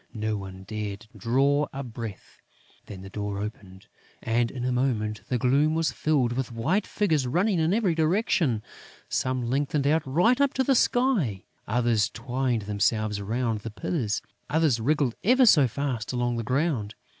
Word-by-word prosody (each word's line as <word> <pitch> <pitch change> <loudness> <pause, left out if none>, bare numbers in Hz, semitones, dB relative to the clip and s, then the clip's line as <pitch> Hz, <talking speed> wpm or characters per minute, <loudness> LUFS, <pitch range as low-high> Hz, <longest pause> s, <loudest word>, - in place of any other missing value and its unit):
No 110 0 -1
one 95 -2 -8
dared 105 0 -5
draw 135 +7 +2
a 135 +1 -5
breath. 115 -5 -8 0.5
Then 95 -2 -9
the 95 - -9
door 105 -1 -4
opened; 100 -2 -7 0.4
and, 115 +1 +1
in 125 -2 -5
a 125 - 0
moment, 115 -4 -1
the 125 - +1
gloom 140 +5 +2
was 160 -4 +1
filled 135 -3 +1
with 130 0 -3
white 160 - 0
figures 155 -11 +1
running 180 - +1
in 160 +1 +2
every 205 -4 +2
direction. 160 - +1 0.5
Some 130 -2 -1
lengthened 140 +2 0
out 155 +3 +3
right 180 - +2
up 280 -1 +2
to 265 - +2
the 270 - +3
sky; 230 - +2 0.2
others 115 -1 +2
twined 125 -4 -2
themselves 105 0 0
round 115 +2 -1
the 115 - -6
pillars; 110 - -2 0.3
others 155 -6 +2
wriggled 140 0 +1
ever 255 +5 +5
so 150 - +6
fast 125 -3 -3
along 120 -1 -1
the 115 - -2
ground. 130 -4 -1
125 Hz, 165 wpm, -26 LUFS, 110-155 Hz, 0.5 s, so